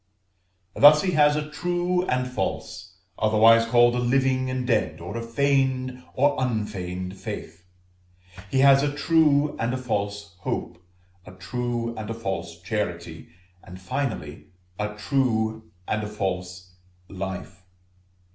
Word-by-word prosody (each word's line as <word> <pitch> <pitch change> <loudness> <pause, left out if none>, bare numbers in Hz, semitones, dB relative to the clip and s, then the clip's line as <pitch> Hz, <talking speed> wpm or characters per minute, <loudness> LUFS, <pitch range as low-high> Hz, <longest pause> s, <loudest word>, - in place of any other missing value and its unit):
Thus 150 +1 +7
he 185 - +1
has 150 -2 +4
a 150 0 -2
true 175 +3 -1
and 125 0 0
false 95 -6 -5 0.2
(otherwise 110 +2 +5
called 120 0 +5
a 125 - -1
living 130 +1 +1
and 130 -1 -2
dead, 80 -10 0
or 85 +5 -7
a 115 - -3
feigned 130 +1 0
or 145 +2 +3
unfeigned) 95 -6 -3
faith. 95 -1 -8 0.8
He 130 - +2
has 140 0 +7
a 145 0 0
true 150 -1 +2
and 120 +3 0
a - - -2
false 100 -5 -4
hope, 90 -1 -4 0.5
a 95 - -10
true 115 +4 -3
and 110 -1 -6
a 115 - -3
false 90 -6 -5
charity, 85 -6 -4 0.3
and, 90 0 -11
finally, 95 - -4 0.3
a 105 0 -3
true 110 -2 -1 0.2
and 105 - -1
a - - -3
false 90 -3 -4 0.3
life. 95 -1 -6
115 Hz, 135 wpm, -25 LUFS, 95-135 Hz, 0.8 s, Thus